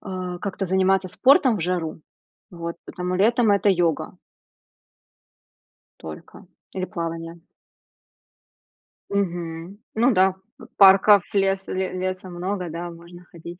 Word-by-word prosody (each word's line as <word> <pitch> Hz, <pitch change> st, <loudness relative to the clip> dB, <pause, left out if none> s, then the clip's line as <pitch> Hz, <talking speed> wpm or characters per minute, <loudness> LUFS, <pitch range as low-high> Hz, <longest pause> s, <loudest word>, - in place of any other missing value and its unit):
А, 185 Hz, -2 st, -5 dB
как-то 195 Hz, +1 st, -4 dB
заниматься 190 Hz, 0 st, +2 dB
спортом 260 Hz, -, +4 dB
в -, -, -5 dB
жару, 165 Hz, -2 st, -3 dB, 0.5 s
вот, 170 Hz, -1 st, -6 dB
потому 180 Hz, 0 st, -4 dB
летом 225 Hz, +3 st, +3 dB
это 200 Hz, 0 st, +3 dB
йога 175 Hz, -4 st, 0 dB, 1.8 s
только. 80 Hz, -1 st, -11 dB, 0.3 s
Или 185 Hz, -1 st, -3 dB
плавание. 165 Hz, -2 st, -6 dB, 1.7 s
Мгм, 175 Hz, -2 st, -3 dB, 0.2 s
ну 240 Hz, +3 st, +3 dB
да, 190 Hz, -1 st, +3 dB, 0.2 s
п -, -, -13 dB
парков, 195 Hz, 0 st, +7 dB
леса 195 Hz, -1 st, 0 dB
ле 185 Hz, 0 st, -2 dB
леса 185 Hz, 0 st, -4 dB
много, 180 Hz, 0 st, -4 dB
да 170 Hz, +2 st, -5 dB
можно 170 Hz, +1 st, -14 dB
ходить. 170 Hz, +1 st, -10 dB
185 Hz, 115 wpm, -23 LUFS, 170-195 Hz, 1.8 s, парков